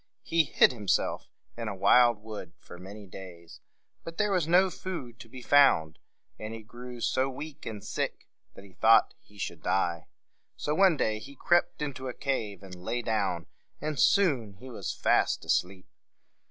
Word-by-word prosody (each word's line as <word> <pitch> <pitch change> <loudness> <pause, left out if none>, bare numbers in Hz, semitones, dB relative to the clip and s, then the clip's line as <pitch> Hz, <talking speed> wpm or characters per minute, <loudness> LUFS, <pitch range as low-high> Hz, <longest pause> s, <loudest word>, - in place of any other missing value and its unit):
He 165 -1 +2
hid - - +5
himself 105 -5 -1 0.3
in 115 -1 -5
a 100 - -3
wild 120 +2 +4
wood 110 -1 -8
for 90 - -13
many 100 +3 -10
days; 90 -3 -11 0.4
but 165 0 -8
there 210 -1 +1
was 180 -5 +1
no 185 +2 +4
food 150 -13 -7
to 115 - -12
be 125 +1 -10
found, 130 - +4 0.4
and 110 +1 -6
he 110 - -10
grew 120 +2 -10
so 130 +3 +1
weak 145 +2 -8
and 105 -3 -6
sick - - -4 0.3
that - - -12
he 95 - -17
thought 115 +4 +5
he 105 - -22
should - - -5
die. 85 -4 0 0.5
So 150 - -2
one 185 -1 +4
day 110 -4 0
he 140 +6 -11
crept 175 +2 +1
into 130 -2 -5
a 125 - -5
cave 105 -8 -3
and 95 -1 -11
lay 90 +7 -4
down, 95 -7 -1 0.3
and 155 -2 -3
soon 140 - +3
he 125 +6 -11
was 100 -5 -4
fast - - +1
asleep. 90 0 0
115 Hz, 175 wpm, -29 LUFS, 100-140 Hz, 0.5 s, hid